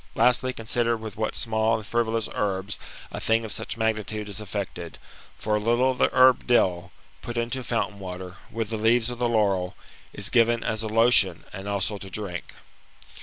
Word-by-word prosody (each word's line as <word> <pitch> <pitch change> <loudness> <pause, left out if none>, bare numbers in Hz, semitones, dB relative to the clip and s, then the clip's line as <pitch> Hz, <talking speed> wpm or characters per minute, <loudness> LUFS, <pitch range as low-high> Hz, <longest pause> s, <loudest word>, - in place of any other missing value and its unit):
Lastly, 125 +1 +3
consider 115 0 0
with 110 -2 -8
what 110 0 -2
small 110 0 +1
and 110 - -5
frivolous 115 -1 0
herbs 100 0 -2 0.3
a - - -5
thing 115 0 +1
of 110 - -6
such - - -4
magnitude 110 -1 -2
is 100 +1 -4
effected; 95 -4 -5 0.4
for 105 0 0
a - - +1
little 120 +4 +2
of 125 - -7
the - - +4
herb 130 -1 +5
dill, 90 -7 +2 0.3
put 120 +9 -6
into 120 +2 -1
fountain 115 -4 -2
water, 90 -1 -7
with 115 -1 -4
the 110 - -1
leaves 115 +2 +3
of 120 - -7
the 120 -1 +1
laurel, 100 -5 +1 0.4
is - - -1
given 115 0 +3
as 110 0 -1
a 110 - -3
lotion, 110 -5 +4
and 95 +2 -6
also 100 +1 -1
to 95 - -8
drink. 95 -3 -6
110 Hz, 185 wpm, -25 LUFS, 100-115 Hz, 0.4 s, herb